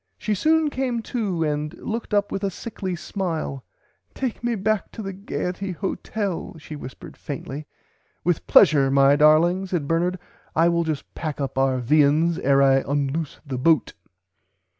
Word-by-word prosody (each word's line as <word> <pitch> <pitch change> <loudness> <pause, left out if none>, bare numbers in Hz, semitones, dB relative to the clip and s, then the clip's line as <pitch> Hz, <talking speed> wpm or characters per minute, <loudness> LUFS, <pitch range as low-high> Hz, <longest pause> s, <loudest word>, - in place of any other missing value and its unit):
"She 215 - -1
soon 310 +8 +2
came 250 -4 -2
to 200 -9 -2
and 150 0 -2
looked 225 +1 -5
up 205 -1 +1
with 195 - -3
a 200 - +1
sickly 190 -2 -5
smile. 165 -7 -4 0.5
Take 255 -3 -3
me 240 -1 0
back 215 0 -1
to 220 - -6
the 195 -1 -5
'Gaierty' 185 -1 -4
Hotel 195 0 -3
she 155 0 -9
whispered 130 -3 -10
faintly. 145 +1 -6 0.6
With 175 -2 0
pleasure 140 -3 +6
my 135 +1 +5
darling 165 +5 +4
said 175 -6 -2
Bernard 175 +3 +1 0.4
I 165 +2 +4
will 170 0 +1
just 155 -3 -4
pack 155 -3 -4
up 140 -2 -3
our 135 -1 +2
viands 150 +6 +3
ere 140 -4 +4
I 135 -1 +5
unloose 140 +3 -2
the 130 -3 -4
boat. 155 0 +3
165 Hz, 160 wpm, -23 LUFS, 145-195 Hz, 0.6 s, pleasure